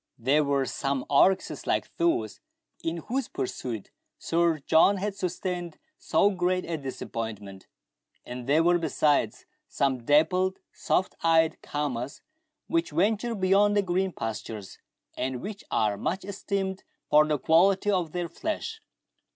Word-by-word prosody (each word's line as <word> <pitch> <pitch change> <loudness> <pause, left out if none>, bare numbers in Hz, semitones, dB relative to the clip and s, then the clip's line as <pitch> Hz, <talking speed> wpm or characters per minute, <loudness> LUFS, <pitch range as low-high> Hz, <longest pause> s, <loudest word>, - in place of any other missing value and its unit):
There 135 +6 +3
were 140 -1 +1
some 135 0 -2
oryxes 185 +7 +3
like - - -1
those 340 0 0 0.4
in 165 0 -3
whose 260 +1 -2
pursuit 120 -4 -5 0.3
Sir 170 -1 +1
John 160 +7 +4
had 200 +2 -2
sustained 180 -2 -3 0.2
so 205 - +3
great 180 -1 0
a 170 - -2
disappointment, 110 -8 -6 0.6
and 125 0 -7
there 155 +4 +4
were 175 +1 +4
besides, 145 -8 +1 0.2
some 130 -3 0
dappled, 180 +7 +3 0.2
soft 190 - 0
eyed 165 -1 +3
caamas, 140 -3 -3 0.4
which 335 0 0
venture 215 +8 +1
beyond 200 +2 +3
the 205 - +3
green 185 +1 0
pasturages, 110 - -6 0.4
and 130 0 -2
which 200 - -7
are 105 -2 +1
much 185 - -2
esteemed 195 -1 -3 0.3
for 150 +1 +6
the 150 -1 +1
quality 185 +8 +3
of 180 -5 0
their 175 0 -2
flesh. 385 - -4
165 Hz, 135 wpm, -27 LUFS, 140-190 Hz, 0.6 s, for